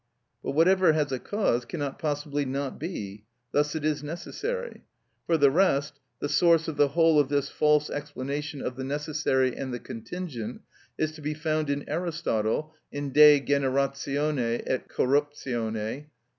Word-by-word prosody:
But - - -2
whatever 175 +2 +5
has 150 -2 0
a 130 - -1
cause 195 - 0
cannot 145 +2 -4
possibly 145 -1 -1
not 135 0 -3
be: 105 - -5 0.3
thus 150 +1 +1
it 155 -1 -2
is 150 -2 0
necessary. 460 - -5 0.5
For 165 - +3
the 140 -2 +5
rest, 145 -4 +2 0.2
the - - -2
source 165 +2 +4
of 160 - -3
the 145 - +4
whole 165 +1 +4
of 140 -2 +2
this 140 -1 0
false 150 0 +3
explanation 145 0 -4
of 125 - -4
the 130 - -4
necessary 140 -2 0
and 130 -1 -4
the 120 - -2
contingent 125 -2 -6 0.4
is 155 0 0
to 155 0 -12
be 150 +1 -2
found 155 -1 -1
in 140 0 -2
Aristotle 155 -4 -1 0.2
in 145 -1 -4
"De 150 +1 +8
Generatione 140 -2 0
et 130 - -2
Corruptione," 135 -4 0
lib. 110 +7 -4
145 Hz, 155 wpm, -27 LUFS, 135-155 Hz, 0.5 s, De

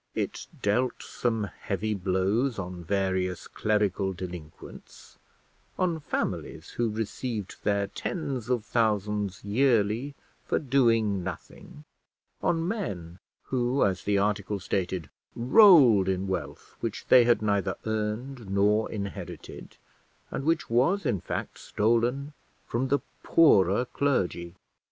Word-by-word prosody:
It - - -3 0.2
dealt 120 +5 +1
some 115 -3 -1 0.2
heavy 105 +2 -2
blows 100 +6 0
on 90 -2 -6
various 95 -1 -1
clerical 100 -2 0
delinquents; 85 -4 -10 0.6
on 175 -3 0
families 145 - -4
who 120 -1 -1
received 110 -1 -4
their 100 -1 +1
tens 135 - -4
of 120 -4 0
thousands 105 -3 0
yearly 115 +3 +1 0.3
for - - 0
doing 115 - +2
nothing; 85 -4 -9 0.6
on 165 0 +1
men 95 - -4 0.3
who, 125 +1 +1
as 95 -2 0
the 100 0 +1
article 105 0 0
stated, 90 -3 -2 0.3
rolled 125 - +7
in 95 +1 -1
wealth 75 -7 -5
which - - -4
they 125 - +8
had 115 -3 +3
neither 100 -2 +1
earned 110 +2 -3
nor 105 +3 +2
inherited, 100 -2 -7 0.5
and 135 - -4
which 165 +1 +1
was 155 +12 +2
in 105 - 0
fact - - -5
stolen 120 +6 0 0.3
from 125 +3 -1
the 140 +2 +1 0.2
poorer 105 - +4
clergy. 95 -11 -1
105 Hz, 115 wpm, -27 LUFS, 95-125 Hz, 0.6 s, they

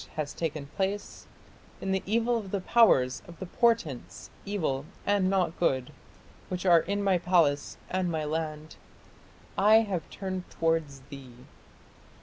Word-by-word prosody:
has 155 -2 -3
taken 155 -3 -3
place, 195 +7 -4 0.5
In 195 - -3
the 190 0 +1
evil 230 +3 +2
of 215 -4 -3
the 200 - -1
powers, 180 - +4
of 170 -1 -12
the 190 - -6
portents, 195 - -1 0.2
evil 155 -10 -1 0.2
and 200 -2 +2
not 185 -3 0
good, 130 -7 +1 0.6
which 180 0 -4
are 175 -2 +7
in 200 +4 -2
my 190 -3 +3
palace 165 -5 +2
and 185 -1 -1
my 160 -2 -2
land, 155 0 -4 0.8
(I) 215 +3 +6
have 190 -7 -3
turned 185 -2 -5
towards 160 -4 -1
thee!... 135 -3 -10
180 Hz, 140 wpm, -28 LUFS, 155-195 Hz, 0.8 s, are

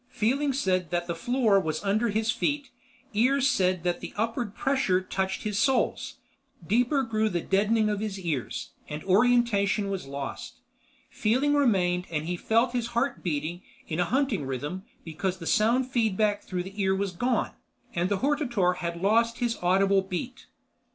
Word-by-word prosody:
Feeling 265 +4 +1
said 185 - 0
that 175 0 -1
the 170 - -2
floor 220 +3 +2
was 155 -2 -3
under 215 +4 +1
his 220 +2 +1
feet, 285 +3 -2 0.4
ears 260 +5 +3
said 185 -8 +1
that 175 -1 0 0.2
upward 225 0 -2
pressure 265 -9 +1
touched 190 0 -3
his 210 -1 -1
soles. 265 +3 +1 0.5
Deeper 245 - +2
grew 220 -2 0
the 175 -3 -1
deadening 210 +5 +2
of 210 -1 -1
his 205 -2 -4
ears, 160 -9 -3 0.2
and 150 +1 -5
orientation 205 -1 +3
was 185 -8 -4
lost. 140 0 -6 0.6
Feeling 260 +7 +1
remained 185 -11 +2
and 155 -2 -2
he 175 +2 -2
felt 230 +7 +2
his 240 -2 -1
heart 270 +4 0
beating 165 +1 -3 0.3
in 160 +1 -3
a 175 - +3
hunting 240 - 0
rhythm 145 +8 -4 0.2
because 175 +3 -3
the 165 - -9
sound 235 +8 +3
feedback 215 -4 +1
through 180 -1 -4
the 195 +2 -6
ear 190 0 +2
was 195 0 -1
gone, 245 +8 0 0.4
and 175 +2 0
the 200 -2 -1
hortator 240 - +1
had 170 -1 -4
lost 230 +3 +3
his 240 -1 -1
audible 195 +2 +3
beat. 240 +8 -6
205 Hz, 165 wpm, -27 LUFS, 180-240 Hz, 0.6 s, ears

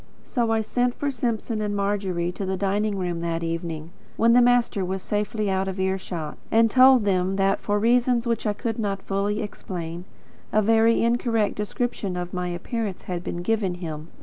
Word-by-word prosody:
So 235 -3 -1
I 225 0 +2
sent 245 +2 0
for 285 -1 -1
Simpson 230 -3 -2
and 205 -1 -1
Margery 195 -4 -1
to 190 - -6
the 190 0 -1
dining 200 +1 0
room 175 -2 -2
that 170 0 -2
evening, 165 -1 -4 0.3
when 230 +1 +5
the 245 - +7
master 240 -4 +3
was 190 +1 -3
safely 210 +1 -1
out 190 0 0
of 190 0 -4
ear 190 0 0
shot, 165 -5 -6
and 225 0 +4
told 255 -3 +6
them 190 -1 +1
that, 195 0 +2
for 205 0 0
reasons 240 +2 +3
which 230 -1 -1
I 210 - +1
could 225 +1 -3
not 200 -3 -2
fully 200 +2 -1
explain, 175 -4 -6 0.5
a 215 - +3
very 225 +2 +4
incorrect 230 -2 +1
description 210 -3 -3
of 175 0 -5
my 180 -1 -2
appearance 195 +3 -4
had 180 -1 -4
been 175 0 -4
given 205 -3 0
him. 160 -3 -6
200 Hz, 190 wpm, -24 LUFS, 180-225 Hz, 0.5 s, the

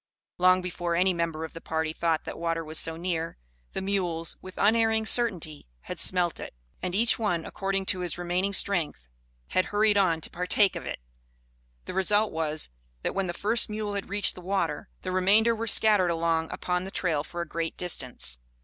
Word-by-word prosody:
Long 185 0 +5
before 175 -1 -2
any 185 +2 +3
member 165 -2 -2
of 160 - -11
the 165 - -9
party 160 0 -2
thought 165 -1 0
that - - -6
water 165 -1 -1
was 155 +1 -3
so 165 0 -2
near, 165 -1 -3 0.4
the - - -3
mules, 175 -4 -1
with 185 0 -11
unerring 220 +1 +3
certainty, 180 - 0
had - - -7
smelt 180 -2 +2
it, - - -8 0.3
and 180 0 -3
each 230 +3 +3
one, 175 -7 0
according 195 0 -2
to 185 - +2
his 180 -1 -2
remaining 180 +3 -1
strength, 175 - +2 0.4
had 185 - +2
hurried 210 0 +2
on 175 -5 +3
to - - -4
partake 180 +3 +2
of - - -6
it. - - -5 0.8
The - - -6
result 205 +3 +2
was, 155 -1 -1 0.4
that - - -1
when 195 -1 -1
the - - -1
first 215 +7 +2
mule 210 -1 -3
had 200 -2 -4
reached 205 0 +4
the 180 - -11
water, 195 +2 -2
the 185 - -3
remainder 205 +5 +4
were 225 +1 -4
scattered 210 -4 +5
along 165 -1 0
upon 180 0 -2
the 190 - -6
trail 165 -6 0
for 175 +2 -6
a 170 - -4
great 165 0 -3
distance. 125 - -1
180 Hz, 195 wpm, -27 LUFS, 165-200 Hz, 0.8 s, Long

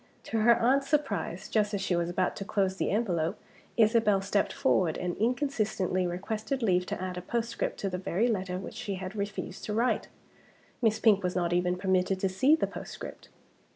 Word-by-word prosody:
To 225 - -2
her 235 +2 +6
aunt's 270 +4 +2
surprise, 275 - -1
just 210 -1 +1
as 195 - -2
she 180 - 0
was 170 0 0
about 180 +1 0
to - - -4
close 195 -2 0
the - - 0
envelope 180 -7 0 0.4
Isabel 220 -2 +4
stepped 200 +1 0
forward, 170 -4 +1
and 180 -1 -2
inconsistently 215 -7 0
requested 215 +8 -3
leave 180 -3 +2
to - - -3
add 185 -1 -4
a - - -8
postscript 235 +5 -2
to 195 - 0
the 180 - -3
very 190 +5 +1
letter 185 -5 -1
which 190 - -7
she 200 - -4
had 185 +2 -6
refused 200 0 -4
to 210 - -3
write! 240 +3 +1 0.7
Miss 220 -2 +3
Pink 210 -3 +4
was 180 -1 -1
not 175 -1 +1
even 180 0 +1
permitted 185 0 +1
to 195 - +2
see 260 +12 +4
the 320 - 0
postscript. - - -8
200 Hz, 190 wpm, -29 LUFS, 180-225 Hz, 0.7 s, her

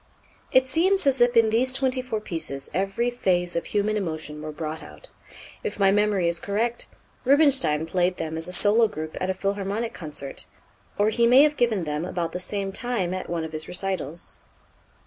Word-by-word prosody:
It 260 0 +5
seems 370 +7 +2
as 270 -2 +3
if 240 0 +4
in 225 -1 +5
these 250 +4 +3
twenty 260 -1 +1
four 250 -4 -3
pieces 160 -8 -5
every 195 +7 0
phase 180 -7 0
of 170 - -1
human 210 +1 0
emotion 155 -6 -4
were 155 0 -5
brought 155 +1 -5
out. - - -13 0.5
If 445 - -4
my 195 -1 +5
memory 205 -3 +2
is 170 0 +1
correct, 230 +4 -1 0.4
Rubinstein 265 - +3
played 180 +2 0
them 160 0 -4
as 160 +1 -1
a - - -5
solo 215 +5 +5
group 155 -6 -6
at 185 - -1
a 190 - 0
Philharmonic 200 +3 -2
concert, 145 -4 -5 0.5
or 205 +1 +3
he 235 +2 +3
may 255 +4 +7
have 300 0 +3
given 230 -8 +1
them 150 0 -3
about 175 -2 -3
the 180 - -4
same 195 +1 -3
time 195 -5 -2
at 185 - -5
one 170 -1 -2
of 160 - -6
his 155 0 -5
recitals. 180 -4 -4
195 Hz, 190 wpm, -25 LUFS, 170-235 Hz, 0.5 s, may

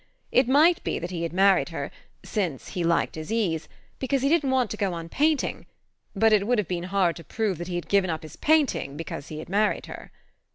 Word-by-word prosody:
It 255 0 +4
might 310 +6 +4
be - - -1
that 175 +1 -5
he 170 -2 -4
had 170 - -2
married 195 +2 +4
her - - -5 0.3
since 180 - -3
he 180 - -3
liked 170 0 +1
his 155 +3 -7
ease 185 -9 0 0.3
because 265 0 0
he 275 - +3
didn't 305 -4 +2
want 255 -4 +1
to - - -2
go 195 -4 0
on 165 -1 -6
painting; 305 - 0 0.5
but 220 +2 +4
it 205 -1 +3
would 245 0 +2
have 210 -5 0
been 175 0 -3
hard 185 -2 +1
to 165 - -10
prove 210 -5 -2
that 175 - -5
he 180 - -4
had 175 - -4
given 200 -2 +2
up 160 0 -3
his 155 -1 -10
painting 290 - +1
because 155 -3 -6
he 155 - -7
had 155 - -7
married 205 +3 +1
her. - - -10
195 Hz, 235 wpm, -26 LUFS, 170-245 Hz, 0.5 s, It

